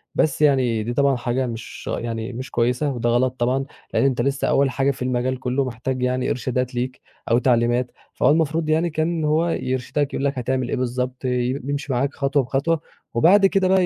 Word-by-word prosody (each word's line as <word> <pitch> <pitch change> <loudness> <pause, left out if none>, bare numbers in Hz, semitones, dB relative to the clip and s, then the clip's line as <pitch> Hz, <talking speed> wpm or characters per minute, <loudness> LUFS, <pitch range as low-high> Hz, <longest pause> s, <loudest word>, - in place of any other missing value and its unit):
بس 150 -1 +1
يعني 130 -7 +3
دي 120 +2 -3
طبعًا 140 0 +3
حاجة 125 +1 -1
مش 115 -1 -7
يعني 115 +1 -4
مش 130 +3 -6
كويسة، 125 +5 +1
وده 120 -1 -1
غلط 125 +2 +2
طبعًا، 130 +3 +1 0.3
لإن - - +3
أنت 130 -3 +2
لسه 140 +2 0
أوّل 140 0 +3
حاجة 135 +2 +1
في 135 - -10
المجال 125 0 -1
كُلّه، 130 +1 0
محتاج 130 +1 -3
يعني 125 0 0
إرشادات 125 0 -2
ليك 125 +1 -3 0.3
أو 120 - +5
تعليمات، 120 0 +2 0.2
فهو 130 - +2
المفروض 160 +1 +1
يعني 160 +2 +2
كان 160 +1 -1
هو 160 +3 +2
يرشدَك، 130 +1 -1
يقول 140 - -1
لَك 140 -2 -1
هتعمل 125 0 -1
إيه - - 0
بالضبط، 125 +1 -3
ي 125 -1 0
يِمشي 140 0 -3
معاك 140 +3 0
خطوة 140 0 +1
بخطوة، 145 +6 0 0.3
وبعد 185 - +5
كده 195 -1 +3
بقى 190 -1 +4
130 Hz, 195 wpm, -22 LUFS, 125-145 Hz, 0.3 s, أو